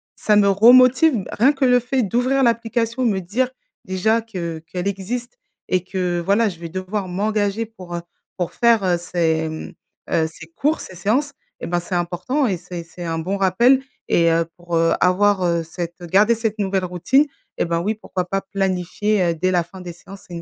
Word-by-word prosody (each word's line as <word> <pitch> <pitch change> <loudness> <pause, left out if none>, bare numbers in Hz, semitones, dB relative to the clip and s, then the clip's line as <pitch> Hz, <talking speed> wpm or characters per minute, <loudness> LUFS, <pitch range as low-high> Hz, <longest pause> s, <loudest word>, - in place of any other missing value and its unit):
ça 210 -1 +2
me 200 - +5
re-motive. 255 +7 +6
Bah, - - -9
rien 255 +6 +5
que 275 -2 0
le 250 -1 +5
fait 250 +1 0
d'ouvrir 250 +6 +1
l'application, 235 0 0
me 205 -5 +1
dire 225 +8 -1 0.3
déjà 210 +5 +1
que 175 -7 -5
qu'elle 180 +3 -4
existe 235 - -4 0.3
et 185 -1 +1
que, 180 -2 -2
voilà, 205 +5 +3
je 175 - -10
vais 170 -1 -7
devoir 185 +3 -4
m'engager, 205 +3 -1
pour, 185 -6 -9
heu, 170 - -3 0.4
pour 175 -2 -3
faire, 235 -3 +3
heu, 180 -2 +2
ces, 165 -2 0
mmh, 155 - -7 0.4
heu, 160 -1 +2
ces 160 - -12
cours, 300 +3 +1
ces 185 - -9
séances 250 - 0 0.3
et - - -4
ben 175 0 0
c'est 175 +1 -5
important 175 - -1
et 190 -4 -1
c'est 175 0 -8
c'est 175 +1 -9
un 165 -1 -2
bon 185 +5 -2
rappel, 235 +8 +4 0.3
et 170 -1 +4
heu, 165 0 +2
pour, 175 -1 -4
heu, 165 0 +3
avoir, 195 +2 +3
heu, 170 -1 +1
cette 170 +1 -7
garder 205 +7 +3
cette 220 -1 -3
nouvelle 195 -1 0
routine 180 - +2 0.3
et - - +1
ben 170 -1 0
oui 210 +5 -1
pourquoi 185 -4 -4
pas 195 +2 -2
planifier, 195 +1 -1
heu, 170 - +1
dès 185 +3 0
la 175 -2 +2
fin 185 +3 -13
des 175 -1 -7
séances? 195 +3 -13
C'est 175 - -11
une 170 - -5
190 Hz, 205 wpm, -21 LUFS, 175-225 Hz, 0.4 s, re-motive